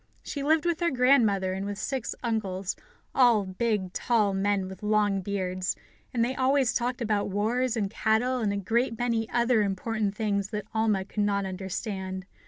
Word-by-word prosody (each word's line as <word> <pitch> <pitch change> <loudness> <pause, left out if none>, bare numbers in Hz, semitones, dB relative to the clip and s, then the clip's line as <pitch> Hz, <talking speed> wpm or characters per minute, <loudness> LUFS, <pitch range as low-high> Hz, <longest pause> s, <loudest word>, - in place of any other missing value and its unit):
She 285 - -4
lived 310 +3 +2
with 340 -2 +1
her 345 -1 +2
grandmother 235 - +3
and 190 +1 -3
with 200 0 -4
six 260 +2 -3
uncles, 200 -5 -2 0.4
all 235 -6 +5
big, 190 -1 -1
tall 215 -5 +2
men 195 0 0
with 190 -1 -9
long 210 -2 +2
beards, 185 -1 -2 0.4
and 235 -1 +2
they 255 - -2
always 260 -1 +2
talked 245 +1 -1
about 210 -2 0
wars, 230 +5 0
and 205 -3 +1
cattle, 225 +4 +1
and 215 -4 0
a 200 - -1
great 230 +4 0
many 230 -2 0
other 235 -1 +3
important 205 +1 -1
things 205 -3 0
that 210 -2 -4
Alma 215 -4 +1
could 210 - -3
not 200 -1 +1
understand. 190 0 -4
215 Hz, 175 wpm, -27 LUFS, 195-240 Hz, 0.4 s, all